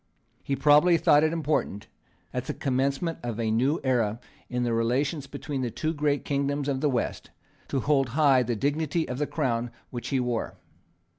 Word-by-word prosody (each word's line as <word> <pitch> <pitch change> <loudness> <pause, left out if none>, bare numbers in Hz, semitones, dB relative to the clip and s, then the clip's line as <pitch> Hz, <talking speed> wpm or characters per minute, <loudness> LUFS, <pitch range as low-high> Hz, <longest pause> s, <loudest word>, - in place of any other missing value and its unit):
He 140 - -2
probably 150 +5 +5
thought 150 -2 +5
it 155 - +2
important, 150 -10 -1 0.5
at - - -3
the - - -4
commencement 140 +5 -1
of 120 -2 -4
a 110 -1 0
new 130 +8 +2
era 120 -4 +1 0.3
in 125 -1 -1
the 120 -1 0
relations 135 +6 0
between 140 -1 -5
the 125 - -1
two 155 +8 -2
great 145 -2 0
kingdoms 140 0 -1
of 135 -2 -1
the 150 - +2
West, 125 -4 -2 0.4
to 135 - -1
hold 135 -2 +2
high 140 -4 +5
the 120 -1 -1
dignity 150 +6 0
of 125 +1 -4
the 150 - 0
Crown 120 -5 -1 0.2
which 120 -1 -5
he 135 - 0
wore. 125 -2 -2
135 Hz, 180 wpm, -27 LUFS, 120-150 Hz, 0.5 s, probably